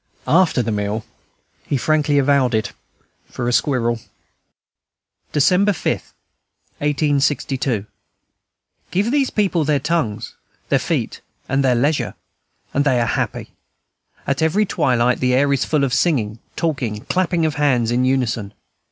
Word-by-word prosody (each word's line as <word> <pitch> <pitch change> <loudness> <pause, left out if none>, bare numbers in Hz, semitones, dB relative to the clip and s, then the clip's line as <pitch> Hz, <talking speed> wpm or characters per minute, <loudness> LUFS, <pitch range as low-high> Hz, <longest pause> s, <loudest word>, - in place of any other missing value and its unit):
After 165 -6 +3
the 115 - -2
meal 105 +1 -2 0.6
he 140 - -1
frankly 150 +1 +1
avowed 135 -3 +3
it 110 -2 -1 0.6
for 120 - -4
a 120 - +1
squirrel. 120 -4 +1 1.3
December 185 +7 +3
5, - - -1 0.9
1862. 140 -5 0 1.0
Give 205 +6 0
these 280 -2 +2
people 190 -6 +1
their 150 0 +2
tongues, 135 -8 -2 0.4
their - - +3
feet, - - -2 0.3
and 135 +1 +1
their 130 -2 +3
leisure, 140 +5 0 0.6
and 140 - +2
they 130 -4 +2
are 120 - +2
happy. - - -2 0.7
At 140 +2 -1
every 185 +7 +2
twilight 125 -7 +1
the 125 -1 +2
air 140 +1 +3
is 135 - 0
full 150 -3 +1
of 130 -2 0
singing, 115 -10 +1 0.2
talking, 135 -10 -1
and 105 - -14
clapping 175 -2 +1
of 155 - 0
hands 130 -6 +1
in 125 +1 +1
unison. 120 -6 -1
140 Hz, 135 wpm, -20 LUFS, 120-155 Hz, 1.3 s, After